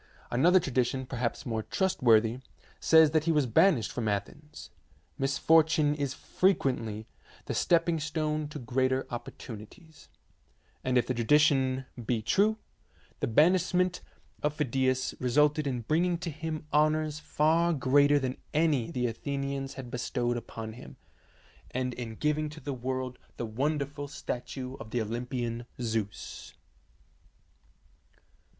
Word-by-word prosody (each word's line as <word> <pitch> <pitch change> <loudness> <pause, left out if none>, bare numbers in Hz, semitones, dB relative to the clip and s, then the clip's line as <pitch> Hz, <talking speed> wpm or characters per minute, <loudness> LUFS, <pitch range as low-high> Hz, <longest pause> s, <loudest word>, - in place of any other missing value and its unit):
Another 170 +10 +5
tradition, 130 -3 -1
perhaps 125 -2 -3
more 115 -2 -2
trustworthy, 115 - +2 0.4
says 160 -2 +6
that 155 -1 +2
he 165 - +3
was 150 -3 +3
banished 120 - +3
from 120 -3 -3
Athens. 145 +9 -5 0.5
Misfor 150 +4 +4
tune 155 -2 +1
is 140 -2 -3
frequently 120 - 0 0.4
the - - -3
stepping 170 -1 +2
stone 155 0 -2
to 150 - -8
greater 130 +2 0
opportunities, 120 - -9 0.7
and 130 -1 +1
if 120 - +3
the 130 - -1
tradition 130 +1 +3 0.2
be 115 +1 0
true, 205 - +3 0.6
the - - -1
banishment 180 +6 +3 0.4
of 150 0 0
Phidias 130 -2 0
resulted 150 +4 +2
in 125 -3 -2
bringing 170 +8 +1
to 170 -1 -4
him 155 0 -5
honours 155 0 +2
far 160 +2 +2
greater 145 0 +4
than 130 -2 -2 0.2
any 150 -7 +2
the 125 -7 -1
Athenians 140 +3 -3
had 130 -2 -8
bestowed 120 -1 -1
upon 115 -1 -6
him, 65 - -12 0.7
and 125 0 -2
in 115 -2 -6
giving 150 +3 0
to 150 +1 -10
the 140 0 -4
world 130 0 -4 0.2
the 120 - -3
wonderful 145 +4 -2
statue 130 -1 -5
of 110 - -9
the 120 - -1
Olympian 120 +1 -3
Zeus. 110 -4 -4
135 Hz, 130 wpm, -29 LUFS, 120-155 Hz, 0.7 s, says